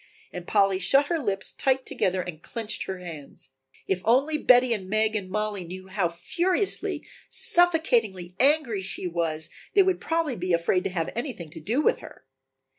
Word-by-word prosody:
And 180 -1 -7
Polly 195 -2 +3
shut 275 +10 +4
her 340 -2 +1
lips 195 -8 -1
tight 265 -1 +1
together 185 0 0
and 165 -3 -8
clenched 220 +2 -3
her 190 - -4
hands. 155 -6 -10 0.3
If 185 -1 -1
only 275 +7 +2
Betty 245 -2 +5
and 190 -4 -5
Meg 215 +1 +1
and 195 -3 -3
Mollie 210 -1 -2
knew 185 +2 -9
how 190 -3 0
furiously, 350 - -1 0.2
suffocatingly 250 - +2
angry 265 -6 +3
she 190 0 -5
was 165 -3 -2 0.2
they 395 - +7
would 375 -1 0
probably 325 -5 -1
be 180 -2 -2
afraid 170 +2 +2
to - - 0
have 170 -3 -2
anything 230 - -5
to 165 - -9
do 225 - 0
with 470 - +2
her. - - -13
205 Hz, 175 wpm, -26 LUFS, 180-265 Hz, 0.3 s, they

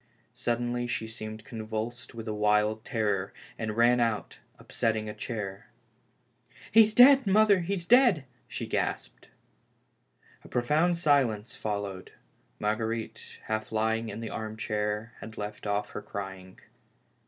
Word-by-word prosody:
Suddenly 120 +1 -1
she 120 -2 -2
seemed 110 -1 -8
convulsed 110 +2 -5
with 115 0 -7
a 110 - -2
wild 105 +1 +2
terror, 105 -6 -1 0.3
and 110 -1 -3
ran 120 +1 +5
out, 115 -3 -1 0.2
upsetting 110 -1 -1
a 105 - -4
chair. 100 -5 -6 0.5
" - - -24
He 225 - +8
is 215 0 +3
dead, 265 -1 +8
mother, 205 0 +5
he 185 +3 -1
is 175 -3 -5
dead 245 0 +6
1" 150 - -10 0.2
she - - -5
gasped. - - -3 1.2
A - - -13
profound 155 +8 +2
silence 130 -9 +2
followed. 100 -3 -4 0.4
Marguerite, 110 +1 -3
half 110 0 -3
lying 110 +1 0
in 115 - -6
the 115 - -5
arm 110 0 -5
chair, 105 +1 -2
had 110 -1 -10
left 105 0 -5
off 105 0 -1
crying. 95 -3 -7
110 Hz, 140 wpm, -29 LUFS, 105-120 Hz, 1.2 s, He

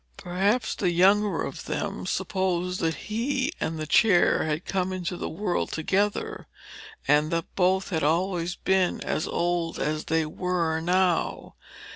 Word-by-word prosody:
Perhaps 200 +6 0
the 185 - 0
younger 195 +4 +3
of - - -6
them - - -3
supposed 180 -1 -1
that 165 -1 0
he 260 - -2
and 160 0 -2
the 155 - -3
chair 180 +1 +4
had 155 +2 -2
come 190 -1 -1
into 185 -1 -3
the - - -4
world 180 +1 -2
together, 200 +6 -1 0.6
and 150 +2 +4
that 165 0 -3
both 190 +1 +2
had 160 -4 -1
always 175 +2 0
been 190 -2 +1
as 155 - -2
old 170 -1 -1
as 155 +1 -2
they 160 0 +1
were 165 0 -1
now. 180 0 0
180 Hz, 145 wpm, -26 LUFS, 165-190 Hz, 0.6 s, chair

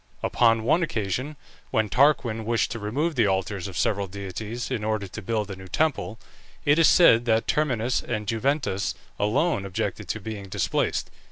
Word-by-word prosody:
Upon 115 -2 +3
one 160 +9 +3
occasion, 130 - -2 0.3
when 110 -1 +1
Tarquin 120 -2 +2
wished 115 +1 0
to 115 - -4
remove 140 +11 -1
the 115 -6 +3
altars 95 0 -1
of 95 - -7
several 100 -1 0
deities, 100 +5 -6
in 115 -5 -2
order 110 -2 -1
to 110 - -8
build 105 -1 -2
a - - -5
new 95 0 -11
temple, 130 - -1 0.5
it 145 +3 +4
is 165 - +6
said 120 -9 +6
that 110 -1 +2
Terminus 125 -5 +1
and 110 -3 -3
Juventas 115 -2 -1 0.2
alone 110 - +1
objected 95 -2 -3
to 110 - -3
being 105 -1 -6
displaced. - - -1
110 Hz, 170 wpm, -25 LUFS, 100-130 Hz, 0.5 s, is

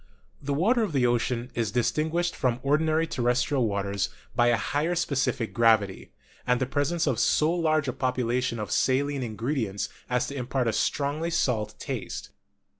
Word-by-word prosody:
The 140 0 -2
water 225 - +3
of 210 -8 -1
the 130 -3 +3
ocean 120 +1 0
is 115 -3 -1
distinguished 160 - 0
from 125 -2 0
ordinary 155 +3 +2
terrestrial 125 -2 +1
waters 100 -1 -1 0.3
by 120 - +4
a 120 -1 +4
higher 150 +10 -1
specific 130 -7 -1
gravity, 110 -4 +2 0.4
and 125 0 +3
the 130 - +1
presence 145 +5 0
of 130 -6 0
so 155 +6 +3
large 155 -4 +1
a 130 - -1
proportion 125 -1 -1
of 105 -2 -5
saline 140 +1 +1
ingredients 115 -3 -2 0.2
as 125 0 +1
to 140 - -6
impart 125 -1 -1
a 115 - +1
strongly 145 +8 0
salt 115 -10 0
taste. - - -5
130 Hz, 160 wpm, -27 LUFS, 120-150 Hz, 0.4 s, by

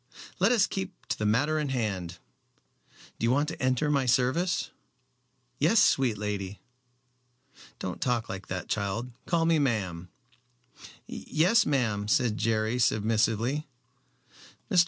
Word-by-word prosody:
"Let - - +4
us 230 -5 +4
keep 190 0 -6
to - - -2
the 105 - 0
matter 145 +9 +2
in 150 -2 -2
hand. 95 -9 -2 1.0
Do - - -6
you 115 - +3
want 145 +4 +2
to 160 - -7
enter 130 +3 +1
my 140 -3 +1
service?" 130 +9 +1 0.9
"Yes, 170 +10 +4
sweet 130 - +3
lady." 100 -1 -4 1.2
"Don't 90 -2 -5
talk 120 -3 0
like 95 0 -7
that, 95 -1 -4
child. 110 +4 -2 0.2
Call 165 -1 +2
me 165 -1 +3
ma'am." 95 - -1 1.0
"Yes, 185 +9 +2
ma'am," 110 -8 0
said 110 -1 +1
Jerry, 110 +2 0
submissively. 115 +5 +1 1.0
"Mr. 180 - +5
120 Hz, 130 wpm, -28 LUFS, 105-150 Hz, 1.2 s, Mr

